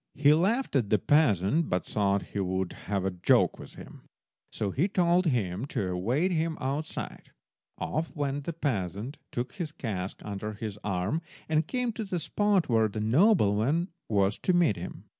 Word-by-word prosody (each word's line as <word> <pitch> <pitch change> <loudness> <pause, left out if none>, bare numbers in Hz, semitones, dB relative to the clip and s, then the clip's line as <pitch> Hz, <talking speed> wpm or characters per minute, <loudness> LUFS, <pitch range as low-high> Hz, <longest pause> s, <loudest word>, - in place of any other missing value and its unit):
He 145 +1 +5
laughed 200 - +1
at 120 -7 +2
the 105 - +4
peasant, 135 - +3
but 90 - 0
thought 100 -1 +1
he 100 - -2
would 95 -1 -1
have 100 -2 -3
a 95 - +1
joke 90 -1 +3
with - - -11
him, - - -11 0.5
so 100 -2 -2
he 160 - +1
told 180 -2 +2
him 110 - 0
to 95 -8 -2
await 120 - 0
him 165 -1 0
outside. 140 +4 -4 0.5
Off 155 +2 -2
went 145 -1 -2
the 170 - -3
peasant, 115 - -3
took 125 +1 -3
his 165 -5 -4
cask 100 -10 -4
under 105 +1 -4
his 105 -1 -6
arm, 100 - -1 0.3
and 155 0 +1
came 250 -2 -1
to 220 - -4
the 190 -3 -3
spot 195 +1 +1
where 115 -2 +3
the 110 +1 -5
nobleman 135 - +3 0.2
was 100 -1 +2
to 185 - +1
meet 175 - +4
him. 85 - -7
125 Hz, 175 wpm, -28 LUFS, 100-165 Hz, 0.5 s, He